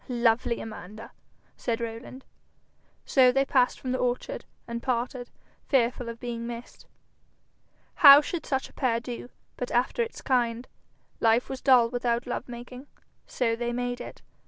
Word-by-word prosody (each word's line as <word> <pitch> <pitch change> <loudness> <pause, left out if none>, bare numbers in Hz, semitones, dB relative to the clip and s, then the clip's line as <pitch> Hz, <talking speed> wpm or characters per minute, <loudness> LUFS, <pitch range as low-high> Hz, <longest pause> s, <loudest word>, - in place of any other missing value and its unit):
'Lovely 235 -1 +1
Amanda!' 215 0 -9 0.4
said 235 -1 -2
Rowland. 235 +3 -7 0.8
So 255 -2 +5
they 270 +2 +2
passed 250 -2 +2
from 255 - -4
the 255 - -1
orchard 250 - -2 0.2
and 235 0 -4
parted, 245 0 -2 0.4
fearful 245 -2 +1
of 230 0 -8
being 235 -1 -5
missed. 235 0 -9 1.1
How 280 -3 +10
should 320 +2 -4
such 265 -1 -1
a - - -21
pair 240 -4 0
do, 245 0 -7 0.3
but 250 - -4
after 245 - +1
its 460 0 -4
kind? 240 -2 0 0.5
Life 230 +2 +3
was 265 -1 -5
dull 250 -4 +5
without 240 -1 -1
love 245 - -4
making, 250 +3 -9 0.4
so 230 -2 0
they 240 +1 -3
made 245 0 -3
it. - - -10
245 Hz, 150 wpm, -27 LUFS, 235-255 Hz, 1.1 s, How